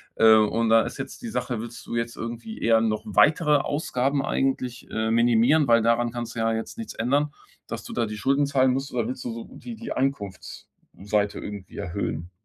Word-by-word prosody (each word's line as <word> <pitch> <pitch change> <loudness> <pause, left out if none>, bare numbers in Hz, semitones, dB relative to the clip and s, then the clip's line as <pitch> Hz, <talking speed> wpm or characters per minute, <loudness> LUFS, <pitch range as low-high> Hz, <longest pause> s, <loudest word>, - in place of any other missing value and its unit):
Äh, 110 0 +7
und 110 +1 +2
da 115 0 +6
ist - - -5
jetzt 135 0 -7
die 235 - -5
Sache: 120 - -2
Willst 115 0 -9
du - - -5
jetzt 115 0 -2
irgendwie 120 - -6
eher 115 -1 +4
noch 110 -1 0
weitere 150 - +4
Ausgaben 140 -1 -1
eigentlich, 130 -3 -1
äh, 110 0 -1
minimieren? 120 +5 +4
Weil 115 -1 +5
daran 115 0 +2
kannst 120 -1 -5
du - - -4
ja 115 0 +2
jetzt 110 - -4
nichts 225 -1 -6
ändern, 145 +5 +1 0.3
dass - - -5
du - - -7
da 120 -1 0
die 105 0 -6
Schulden 135 +7 +2
zahlen 130 -2 +3
musst. 135 +1 -3
Oder 120 -3 0
willst 125 0 -5
du 120 - -3
so 115 0 -6
die 235 - -9
die 230 +1 -5
Einkunftsseite 105 -3 -3
irgendwie 100 -3 -8
erhöhen? 85 -2 -4
120 Hz, 205 wpm, -25 LUFS, 110-135 Hz, 0.3 s, Äh